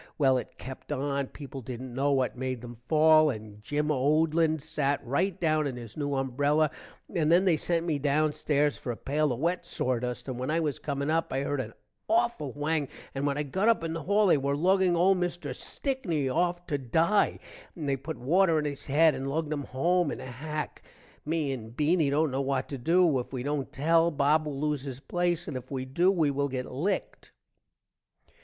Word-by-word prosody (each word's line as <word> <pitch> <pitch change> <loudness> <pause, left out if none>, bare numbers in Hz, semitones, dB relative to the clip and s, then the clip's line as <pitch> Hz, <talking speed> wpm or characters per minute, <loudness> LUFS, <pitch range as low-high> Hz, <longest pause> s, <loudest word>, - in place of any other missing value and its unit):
well 135 -3 +4
it 125 - -4
kept 130 +3 -9
on, 140 -1 -1
people 135 -1 -9
dident 125 +1 -7
know 140 +3 +1
what 130 -2 +1
made 130 -1 -3
them 120 -1 -9
fall, 155 0 +6
and 105 -4 -7
Gim 150 +6 -1
Odlin 155 +3 +2
sat 145 -2 -1
write 175 +9 0
down 155 -2 +2
in 130 - -4
his 120 -3 -9
new 145 -2 -2
umbrella 145 +3 +1 0.4
and 160 -4 +2
then 180 +3 +5
they 180 -4 +4
sent 165 +2 -1
me 155 -4 0
down 150 +2 +2
stairs 150 -1 +1
for 125 - -4
a 115 - -6
pail 150 +1 0
of 120 - -2
wet 170 +4 0
sordust 125 0 -2
and 130 -2 -4
when 130 - -3
i 160 +2 +2
was 150 -4 -1
coming 140 0 -2
up 165 +1 0
i 135 - 0
heard 140 -1 -1
an - - -7 0.4
awful 145 -3 +1
whang, 145 0 -1 0.3
and 140 +1 -1
when 140 0 0
i 150 - 0
got 190 +9 -1
up 230 -7 +3
in 165 -1 -2
the 165 - -4
hall 205 +7 +3
they 170 -6 +4
were 140 +1 0
lugging 185 +2 +3
old 185 +2 +4
mister 175 -1 -3
Stickney 210 - -2
off 175 +5 0
to 145 -5 -2
die 165 - +2 0.4
and 155 -4 -5
they 140 - +2
put 140 +4 -6
water 165 +5 +3
on 150 - 0
his 145 -1 -5
head 155 +3 +5
and 135 +1 -4
lugged 155 +1 -1
him 145 -2 -4
home 170 +6 +1
in - - -4
a 130 - -7
hack. 150 +5 -5 0.5
me 155 -3 0
and 115 -3 -7
Beany 155 0 +3
dont 150 +1 +2
know 135 +1 -1
what 135 -1 -1
to 140 - -5
do. 165 +1 +3
if 125 - -6
we 130 -2 -4
dont 145 -1 -2
tell, 165 +4 +3
Bob 150 +1 +2
will 140 -2 -4
lose 150 -2 0
his 135 -2 -6
place 175 +2 -1
and 150 - -5
if 130 0 -6
we 130 -2 -3
do 170 +8 +2
we 160 -7 +2
will 140 +1 -1
get 130 -1 -3
licked. 185 +9 -3
145 Hz, 215 wpm, -28 LUFS, 135-165 Hz, 0.5 s, fall